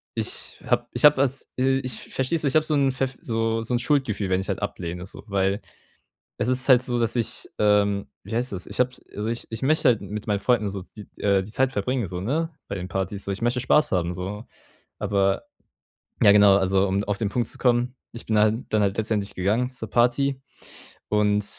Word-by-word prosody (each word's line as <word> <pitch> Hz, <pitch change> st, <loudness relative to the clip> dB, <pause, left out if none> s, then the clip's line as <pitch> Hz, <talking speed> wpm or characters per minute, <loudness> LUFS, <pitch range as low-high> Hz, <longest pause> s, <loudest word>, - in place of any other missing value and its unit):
ich -, -, -3 dB
habe -, -, +1 dB
ich -, -, +3 dB
habe 150 Hz, 0 st, +8 dB
das, 135 Hz, 0 st, -1 dB
äh 135 Hz, +1 st, +2 dB
ich 130 Hz, -, -3 dB
verstehst 140 Hz, +5 st, 0 dB
du, -, -, +3 dB
ich -, -, -4 dB
habe 155 Hz, -, +5 dB
so 155 Hz, -, 0 dB
‘n 140 Hz, -2 st, +3 dB
pfeff 130 Hz, 0 st, -2 dB
so 115 Hz, 0 st, -1 dB
so 120 Hz, -, -4 dB
‘n -, -, +1 dB
Schuldgefühl, 125 Hz, -7 st, 0 dB
wenn 95 Hz, 0 st, +2 dB
ich -, -, -7 dB
halt 100 Hz, -, -2 dB
ablehne 90 Hz, -3 st, -4 dB
so, -, -, -9 dB
weil 100 Hz, +1 st, 0 dB, 0.8 s
es 105 Hz, -, -1 dB
ist 130 Hz, +1 st, +1 dB
halt 125 Hz, -1 st, +7 dB
so, 125 Hz, -1 st, -1 dB
dass 115 Hz, +1 st, +1 dB
ich, 115 Hz, -, -1 dB
ähm 100 Hz, -1 st, +2 dB, 0.2 s
wie 110 Hz, +3 st, -6 dB
heißt 125 Hz, -1 st, -1 dB
das? 90 Hz, -2 st, -5 dB
Ich -, -, -3 dB
habe 125 Hz, 0 st, +3 dB, 0.3 s
also 105 Hz, +2 st, -2 dB
ich 115 Hz, -, -4 dB
ich 110 Hz, +2 st, -6 dB
möchte 150 Hz, 0 st, +3 dB
halt 115 Hz, -, +1 dB
mit 105 Hz, 0 st, -6 dB
meinen 100 Hz, -1 st, +1 dB
Freunden 110 Hz, -1 st, +2 dB
so, 100 Hz, -1 st, -5 dB
siz 105 Hz, -2 st, -10 dB
äh, 100 Hz, -1 st, +2 dB
die 100 Hz, -, -10 dB
Zeit 130 Hz, +1 st, +1 dB
verbringen, 120 Hz, +1 st, -1 dB
so, 90 Hz, 0 st, -5 dB
ne, 155 Hz, -, -1 dB, 0.2 s
bei -, -, -3 dB
den 90 Hz, -1 st, -5 dB
Partys 95 Hz, +2 st, -3 dB
so, 100 Hz, -, -1 dB
ich 100 Hz, -, -6 dB
möchte 120 Hz, +1 st, +1 dB
Spaß 150 Hz, +4 st, +3 dB
haben 90 Hz, -2 st, +1 dB
so. 100 Hz, +5 st, -5 dB, 0.5 s
Aber, 100 Hz, -1 st, +1 dB, 0.8 s
ja 100 Hz, -, +8 dB
genau, 100 Hz, -1 st, +7 dB
also 95 Hz, 0 st, +2 dB
um 100 Hz, +1 st, 0 dB
auf 105 Hz, -1 st, -1 dB
den 105 Hz, -, 0 dB
Punkt 120 Hz, +3 st, -1 dB
zu -, -, -7 dB
kommen, 125 Hz, 0 st, +2 dB, 0.2 s
ich 115 Hz, -, -7 dB
bin 110 Hz, -1 st, +2 dB
halt 105 Hz, +1 st, +4 dB
dann 110 Hz, -, +2 dB
halt 100 Hz, +1 st, 0 dB
letztendlich 105 Hz, -2 st, -1 dB
gegangen 110 Hz, +7 st, 0 dB
zur 115 Hz, -4 st, -8 dB
Party, 130 Hz, +4 st, +2 dB, 0.7 s
und 105 Hz, -1 st, +2 dB
110 Hz, 225 wpm, -24 LUFS, 100-125 Hz, 0.8 s, habe